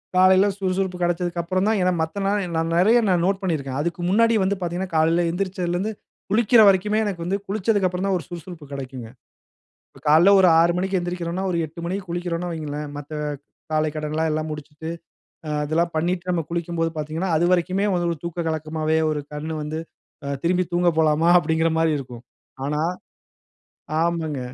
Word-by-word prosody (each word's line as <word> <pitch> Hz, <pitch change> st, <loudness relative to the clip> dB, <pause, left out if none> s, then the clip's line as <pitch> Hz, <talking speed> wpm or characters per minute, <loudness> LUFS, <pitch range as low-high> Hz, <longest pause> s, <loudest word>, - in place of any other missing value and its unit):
காலையில 185 Hz, +2 st, +6 dB
சுறுசுறுப்பு 190 Hz, -1 st, -1 dB
கெடச்சதுக்கப்புறம் 175 Hz, +1 st, 0 dB
தான் 220 Hz, -, +2 dB
ஏனா 180 Hz, 0 st, +3 dB
மத்த 160 Hz, +5 st, -3 dB
நாள் 205 Hz, +1 st, +1 dB
நான் 165 Hz, +1 st, 0 dB
நெறைய 220 Hz, +7 st, +5 dB
நான் 175 Hz, -2 st, +2 dB
நோட் 195 Hz, +1 st, +1 dB
பண்ணியிருக்கேன். 140 Hz, -8 st, -2 dB
அதுக்கு 170 Hz, +2 st, -3 dB
முன்னாடியே 230 Hz, +2 st, +4 dB
வந்து 195 Hz, +1 st, 0 dB
பாத்தீங்கனா 180 Hz, +2 st, -3 dB
காலையில 165 Hz, +2 st, +3 dB
எந்திருச்சதலிருந்து 185 Hz, +1 st, -2 dB, 0.4 s
குளிக்கற 225 Hz, +1 st, +5 dB
வரைக்குமே 205 Hz, +2 st, +3 dB
எனக்கு 185 Hz, -5 st, -3 dB
வந்து 195 Hz, +3 st, 0 dB
குளிச்சத்துக்கப்புறம் 195 Hz, -2 st, 0 dB
தா -, -, +1 dB
ஒரு 170 Hz, -, -7 dB
சுறுசுறுப்பு 175 Hz, -2 st, -9 dB
கெடைக்குங்க. 130 Hz, -4 st, -7 dB, 1.0 s
காலையில 160 Hz, +6 st, +6 dB
ஒரு 185 Hz, -, +6 dB
6 170 Hz, +1 st, +4 dB
மணிக்கு 190 Hz, +1 st, 0 dB
எந்திரிக்கிறோம்னா, 175 Hz, +1 st, -3 dB
ஒரு 170 Hz, -, 0 dB
8 160 Hz, +3 st, -12 dB
மணிக்கு 185 Hz, +2 st, -4 dB
குளிக்கிறோன்னு 175 Hz, 0 st, -3 dB
வையுங்களே, 150 Hz, -3 st, -4 dB, 0.2 s
மத்த 145 Hz, +1 st, -9 dB, 0.6 s
காலைக்கடனெல்லா 155 Hz, 0 st, -1 dB
முடிச்சுட்டு, 150 Hz, +1 st, -7 dB, 0.6 s
அ -, -, -3 dB
அதெல்லாம் 165 Hz, +3 st, 0 dB
பண்ணிட்டு, 175 Hz, +3 st, -1 dB
நம்ம 170 Hz, -2 st, 0 dB
குளிக்கும்போது 170 Hz, -1 st, -1 dB
பாத்தீங்கனா, 155 Hz, +4 st, -3 dB
அது 170 Hz, -, +2 dB
வரைக்குமே 185 Hz, +3 st, +1 dB
வந்து 175 Hz, -1 st, 0 dB
ஒரு 165 Hz, -, -4 dB
தூக்க 170 Hz, 0 st, -3 dB
கலக்கமாவே 155 Hz, 0 st, -1 dB
ஒரு 155 Hz, -1 st, -1 dB
கண் 150 Hz, +2 st, -4 dB
வந்து 150 Hz, +1 st, -4 dB, 0.5 s
அ -, -, -3 dB
"திரும்பி 180 Hz, +2 st, +2 dB
தூங்க 175 Hz, 0 st, +2 dB
போலாமா" 160 Hz, +1 st, +3 dB
அப்படீங்குற 160 Hz, -1 st, +1 dB
மாரி 165 Hz, 0 st, +3 dB
இருக்கும். 125 Hz, -3 st, -9 dB, 0.4 s
ஆனா 150 Hz, +1 st, -1 dB, 1.2 s
ஆமாங்க. 165 Hz, -4 st, -1 dB
170 Hz, 155 wpm, -23 LUFS, 155-185 Hz, 1.2 s, காலையில